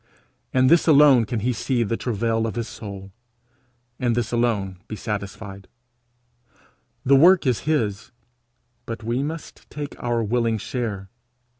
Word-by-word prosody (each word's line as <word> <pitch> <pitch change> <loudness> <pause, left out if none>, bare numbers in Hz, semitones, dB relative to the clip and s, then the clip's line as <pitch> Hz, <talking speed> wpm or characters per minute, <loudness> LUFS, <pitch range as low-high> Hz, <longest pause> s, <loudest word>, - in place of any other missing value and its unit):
In 130 0 +3
this 165 +6 +4
alone 140 -6 +6
can 110 +1 -3
he 125 +4 0
see 120 +2 -1
of 110 - -1
the 115 - +1
travail 115 -1 -1
of 110 - -5
his 115 -1 -3
soul, 100 -3 -9 0.9
in 120 -3 +1
this 120 -1 -1
alone 105 -6 -1
be 110 - -5
satisfied. 100 -1 -6 1.4
The 140 - +6
work 175 +5 +6
is 125 -4 +2
his, 105 -10 -1 0.8
but 115 0 -6
we 120 +3 -1
must 160 +3 -7
take 145 -1 -6
our 120 -1 0
willing 115 0 0
share. 105 -4 -4
115 Hz, 145 wpm, -23 LUFS, 105-130 Hz, 1.4 s, alone